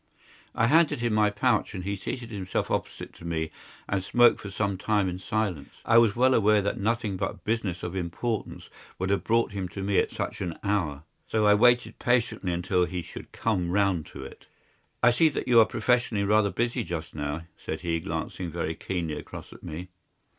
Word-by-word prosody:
I 115 - +3
handed 150 +3 +4
him 120 -2 +1
my 105 -1 +4
pouch, 105 +1 +1
and 90 - -5
he 100 +2 -2
seated 120 +4 -6
himself 95 -3 -3
opposite - - -3
to - - -14
me 80 -2 -2 0.4
and 100 -2 -1
smoked 120 +4 +4
for 100 - -7
some 100 0 -1
time 100 +1 +1
in 90 0 -4
silence. 95 -8 -2
I 115 0 +6
was 115 -3 +3
well 130 +2 +4
aware 105 -2 +4
that 100 0 -1
nothing 110 -1 0
but 95 0 -4
business 105 -6 -1
of 90 +1 -4
importance 95 +5 -3 0.3
would 95 +1 -1
have 100 - +1
brought 115 0 +2
him 95 -2 -3
to 95 - -6
me 100 0 +2
at - - +1
such - - -4
an 85 -2 -3
hour, 85 -9 -1 0.2
so 110 -1 +1
I 105 - +7
waited 120 +1 +3
patiently 120 -6 +1
until 90 +1 +1
he 90 -1 -4
should - - -10
come 95 -6 -1
round 95 -3 +1
to 70 - -9
it. - - -12 0.6
"I 120 - +7
see 160 +7 +4
that 145 - -4
you 120 -2 +6
are 110 - +8
professionally 120 -2 +1
rather 105 0 +3
busy 120 +3 -1
just 85 -5 -5
now," 75 +2 -3 0.2
said 80 - -4
he, 85 -2 -1
glancing 80 +2 -4
very - - -2
keenly 85 -4 -3
across - - -10
at - - -15
me. 85 +4 -7
100 Hz, 200 wpm, -27 LUFS, 90-115 Hz, 0.6 s, are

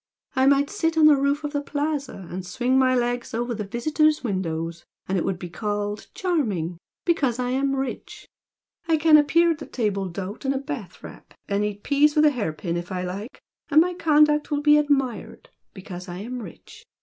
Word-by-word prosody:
I 260 +1 +3
might 280 +1 +3
sit 330 -6 -1
on 315 - +6
the 305 -1 +8
roof 280 +2 0
of 295 0 -4
the 285 - 0
Plaza 285 - -3
and 185 +1 -5
swing 245 +8 -1
my 255 -1 +3
legs 245 -1 -1
over 240 +1 -1
the 215 -2 -4
visitors' 305 +8 +1
windows 170 -6 -3 0.2
and 190 - -1
it 180 - +1
would 190 - -1
be 175 - -7
called 205 +3 -3
'charming' 215 - -1 0.3
because 275 -9 +1
I 250 0 -1
am 275 +1 +1
rich! 270 -1 -5 0.6
I 325 -1 +3
can 310 0 +5
appear 335 +3 +5
at 315 - -3
the 295 - -8
table 200 -5 -2
d'hote 195 +6 -6
in 270 0 +1
a - - -1
bath 270 - -7
wrap - - -12
and 200 +1 0
eat 205 -1 -4
peas 295 +1 +3
with 305 0 +5
a 300 - +6
hair 225 - -2
pin 170 +2 -4
if 175 +2 -6
I 180 -1 -2
like 195 +7 -7 0.3
and 305 0 +6
my 360 +2 +3
conduct 300 -3 +3
will 290 -2 0
be 300 0 +6
admired, 275 -5 -1 0.2
because 185 -1 -9
I 175 - -6
am 240 +5 -6
rich! 430 - -12
255 Hz, 205 wpm, -24 LUFS, 200-295 Hz, 0.6 s, the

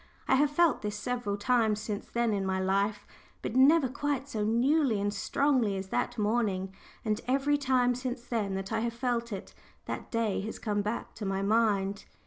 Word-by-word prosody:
I - - +3
have 285 +2 +4
felt 330 +2 +3
this 210 0 -3
several 215 -2 -2
times 220 -1 +2
since 210 -1 -5
then 235 -2 +1
in 200 -1 0
my 190 0 0
life, 200 +2 0 0.4
but - - -3
never 275 +2 +6
quite 280 +1 -2
so 220 -7 -2
newly 240 +2 +2
and 205 0 -1
strongly 255 -9 +1
as 190 0 -6
that 245 - -1
morning, 205 -3 0 0.3
and 215 0 0
every 275 +3 +2
time 255 -3 +2
since 245 -1 -4
then 215 -5 -2
that 195 +1 -4
I 220 - +1
have 230 +1 -1
felt 235 -1 -1
it, 200 - -6 0.3
that - - -5
day 230 -4 0
has 215 +3 -5
come 205 -1 -1
back 210 +3 -4
to 210 - -6
my 195 0 -1
mind. 200 -2 +1
225 Hz, 190 wpm, -30 LUFS, 205-255 Hz, 0.4 s, never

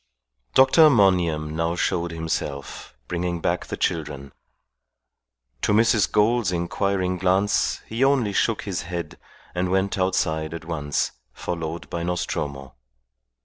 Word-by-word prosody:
Dr. 145 +4 +7
Monygham 90 - +3
now 85 +1 0
showed 85 -1 0
himself, 80 -6 -4
bringing 85 0 -2
back - - -1
the - - -5
children. 70 -4 -2 1.3
To - - +2
Mrs. 110 -1 +3
Gould's 110 -1 +2
inquiring 90 +1 -1
glance 95 +3 +1
he 115 +4 -1
only 135 -7 +2
shook 110 +2 +1
his 95 -6 -3
head 85 -2 -6 0.3
and 90 +1 -1
went 95 +1 0
outside 80 -4 0
at 80 - -8
once, 75 -3 -1 0.2
followed 85 -1 -5
by 85 - -3
Nostromo. 70 -6 -3
90 Hz, 120 wpm, -24 LUFS, 80-100 Hz, 1.3 s, Dr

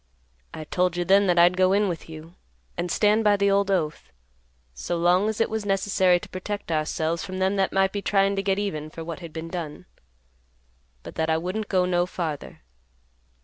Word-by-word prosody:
I 160 - -7
told 180 +3 0
you 175 - -1
then 195 +2 +4
that 175 -1 +2
I'd 175 +1 +6
go 185 +1 +3
in 205 +1 +2
with 170 -3 -5
you 160 +1 -10 0.4
and 175 - -3
stand 210 +4 +2
by 205 -1 +4
the 200 0 +2
old 200 0 +2
oath, 165 -6 -2 0.6
so 115 - -3
long 180 +5 +3
as 220 - -4
it 225 - +3
was 220 -1 -3
necessary 190 -2 +2
to - - -11
protect 200 0 -5
ourselves 160 +1 -1
from 185 -1 -6
them 190 +1 +1
that 195 -1 +1
might 195 0 +2
be 205 - -3
tryin' 195 0 +2
to 195 - 0
get 195 0 0
even 155 -7 -3
for 165 +1 -8
what 165 0 -6
had 170 -3 -9
been 160 +1 -6
done, 165 -1 -6 1.2
but - - -9
that 160 0 -1
I 160 - +2
wouldn't 185 +6 -4
go 185 -2 +2
no 175 -1 +1
farther. 160 - -5
185 Hz, 205 wpm, -25 LUFS, 165-200 Hz, 1.2 s, I'd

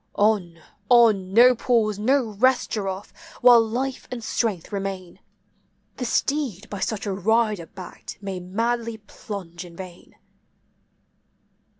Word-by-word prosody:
On! 200 -5 +1 0.3
on! 220 -6 +5
no 245 +5 +7
pause, 220 -4 +1
no 250 +1 +2
rest, 255 +5 +2
giraffe, 195 -2 -4 0.3
while 245 -1 +8
life 250 +4 -3
and 240 -2 -6
strength 210 -7 -2
remain! 195 -3 -5 0.8
The 250 - -3
steed 240 - -1
by 205 - -5
such 215 +2 -2
a 200 - -2
rider 210 -2 +1
backed 185 -2 -10
may 195 -2 -5
madly 230 +5 -2
plunge 195 -5 -8
in 175 -1 -13
vain. 180 -1 -11
215 Hz, 120 wpm, -24 LUFS, 190-235 Hz, 0.8 s, while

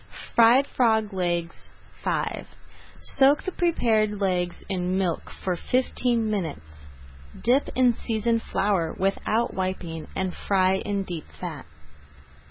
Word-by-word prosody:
FRIED 235 +4 +6
FROG 220 -6 +1
LEGS 175 -2 -2 0.4
V - - -2 0.5
Soak 280 +2 +4
the 375 - -3
prepared 220 - +1
legs 180 -3 -1
in 185 -1 -1
milk 180 -4 -1
for 185 -2 0
fifteen 245 +2 0
minutes. 110 - -4 0.5
Dip 255 +5 +2
in 250 -1 +4
seasoned 230 0 -1
flour 195 -8 0
without 210 +4 0
wiping 185 -4 -4
and 190 -1 -1
fry 190 -1 +2
in 200 0 -2
deep 175 -4 -6
fat. 165 -6 -6
195 Hz, 115 wpm, -25 LUFS, 180-230 Hz, 0.5 s, FRIED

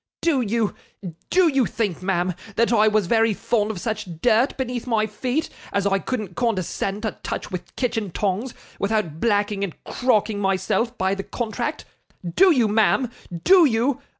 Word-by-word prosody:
Do 310 -6 +3
you 225 -1 0 0.6
do 370 -1 +4
you 270 -7 +2
think, 205 -7 -2
ma'am 185 -1 0 0.2
that 230 +1 +2
I 215 -1 +5
was 215 -2 +2
very 225 +2 +2
fond 215 -1 0
of 210 -5 -4
such 210 -5 -4
dirt 245 +4 +2
beneath 250 -2 -3
my 220 -3 +2
feet, 250 +8 -2 0.2
as 200 0 0
I 195 -1 +2
couldn't 210 -6 -4
condescend 205 -2 -1
to 220 - -3
touch - - -5
with 180 -1 -7
kitchen 225 -5 -1
tongs, 205 +7 -2 0.2
without 200 -7 -1
blacking 205 -2 +1
and 190 -5 -4
crocking 215 -4 +1
myself 205 +5 0
by 190 +1 +1
the 195 - -3
contract? 240 +8 -4 0.5
Do 385 0 +6
you, 250 -8 +3
ma'am 225 +3 +2 0.3
do 370 -3 +7
you? 255 +2 +1
220 Hz, 165 wpm, -23 LUFS, 200-245 Hz, 0.6 s, do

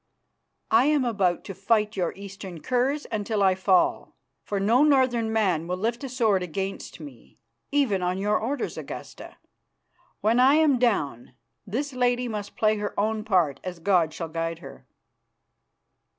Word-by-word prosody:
"I 370 -7 +5
am 295 -3 +2
about 195 -7 0
to 195 - -7
fight 210 +2 +1
your 180 -4 -1
eastern 195 -3 -9
curs 260 +4 0
until 210 -1 -1
I 190 -1 +5
fall, 190 0 +1 0.3
for 200 - -3
no 230 +8 +4
northern 255 -6 +3
man 185 -7 +1
will 180 +1 -2
lift 230 +6 -2
a 270 - -4
sword 225 -6 +1
against 190 +2 -5
me, 140 -7 -13 0.3
even 265 -10 +1
on 180 +1 -1
your 210 +2 +1
orders, 265 +6 -3
Augusta. - - -9 0.8
When 225 +4 +3
I 265 +3 +6
am 305 -5 +4
down, 145 - -1 0.3
this 270 +7 -3
lady 245 0 +1
must 210 -3 -6
play 215 0 +2
her 205 -1 -4
own 215 +1 0
part 180 - +1
as 180 -1 -5
God 170 -2 +2
shall 165 +1 -6
guide 165 +1 -3
her." 165 - -13
210 Hz, 155 wpm, -25 LUFS, 185-245 Hz, 0.8 s, I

